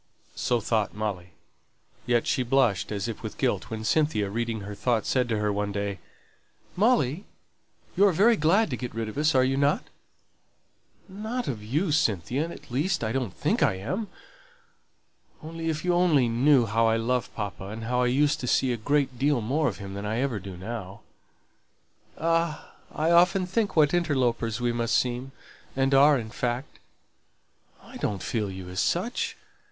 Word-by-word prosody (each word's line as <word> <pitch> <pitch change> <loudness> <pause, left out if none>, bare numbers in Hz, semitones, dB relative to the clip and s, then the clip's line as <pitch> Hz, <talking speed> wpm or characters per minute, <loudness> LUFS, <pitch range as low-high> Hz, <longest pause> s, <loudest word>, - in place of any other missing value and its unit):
So 120 - 0
thought 110 -2 -1
Molly. 100 -4 -4 0.7
Yet 120 -1 +2
she - - +1
blushed, 125 -6 +1
as 100 +1 -2
if 115 - -6
with - - -7
guilt, - - -1
when 110 -1 -5
Cynthia, 110 -7 +1
reading 115 0 -2
her 100 +1 -7
thoughts, 115 +1 0
said 125 -2 +1
to 110 - 0
her 105 -1 0
one 100 0 -2
day, 100 -2 -3 0.8
"Molly, 195 - +2 0.7
you're 200 +1 +5
very 210 +8 +4
glad 180 +3 +2
to - - 0
get 125 -2 -6
rid 115 -1 -2
of 110 - -7
us, 155 0 +2
are 130 0 +5
not 140 +2 +1 1.2
you?" 190 - -14
"Not 235 +4 -3
of 110 -5 -4
you, 150 - 0
Cynthia; 135 - 0
at 170 - -11
least, 155 +5 0
I 110 - -1
don't 125 -5 -2
think - - 0
I - - +3
am. 185 - -3 1.4
Only, 165 +1 -4
if 155 +1 -3
you 180 - +2
but 175 +1 +3
knew 125 +1 +4
how 115 +2 +2
I 110 0 +3
love 125 +2 -1
papa, 100 -2 -5
and 110 +3 -7
how 125 +2 0
I 125 - +2
used 145 +4 +2
to 125 - -4
see 125 +1 +2
a - - -3
great 135 +1 0
deal 140 -1 +2
more 140 +8 0
of 105 -9 -3
him 100 0 -8
than 100 +1 -5
I 110 +2 -1
ever 130 -6 -1
do 95 -1 -9
now 100 0 -7 0.6
" - - -38
"Ah! 165 -1 -1 0.2
I 160 +2 0
often 180 +2 +4
think 205 +3 -1
what 150 -1 +4
interlopers 125 -9 0
we 120 -1 0
must 120 -1 +1
seem, 125 +2 -2 0.4
and 135 +1 +1
are 140 +1 +6
in 110 -3 -6
fact 125 +3 -3 0.5
" - - -39
"I - - -11
don't 100 -2 -3
feel 110 -4 -2
you 95 -1 -8
as 90 +1 -5
such. 215 - -1
125 Hz, 180 wpm, -26 LUFS, 110-155 Hz, 1.4 s, are